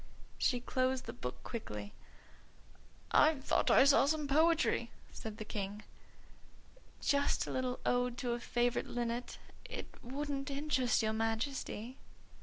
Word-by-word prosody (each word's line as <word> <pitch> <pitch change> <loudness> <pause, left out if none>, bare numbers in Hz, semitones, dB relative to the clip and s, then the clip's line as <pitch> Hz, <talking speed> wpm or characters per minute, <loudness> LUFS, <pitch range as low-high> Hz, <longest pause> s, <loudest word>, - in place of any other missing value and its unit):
She 250 - +2
closed 255 +1 0
the - - -5
book 125 - -6
quickly. 105 - -6 1.2
"I 310 +1 +6
just 270 0 -12
thought - - +2
I - - +7
saw 275 0 +6
some 305 -1 0
poetry," 320 +3 +3 0.2
said 220 -1 -7
the 215 - -6
King. 205 0 -4 1.2
"Just 280 0 +2
a - - -5
little 255 -1 -1
ode 245 0 +1
to 245 -1 -2
a 240 - -1
favourite 240 0 0
linnet. 240 0 -3 0.3
It - - -7
wouldn't 275 +2 -3
interest 275 -4 +1
your 220 0 +1
Majesty." 225 +2 -2
250 Hz, 135 wpm, -34 LUFS, 225-280 Hz, 1.2 s, I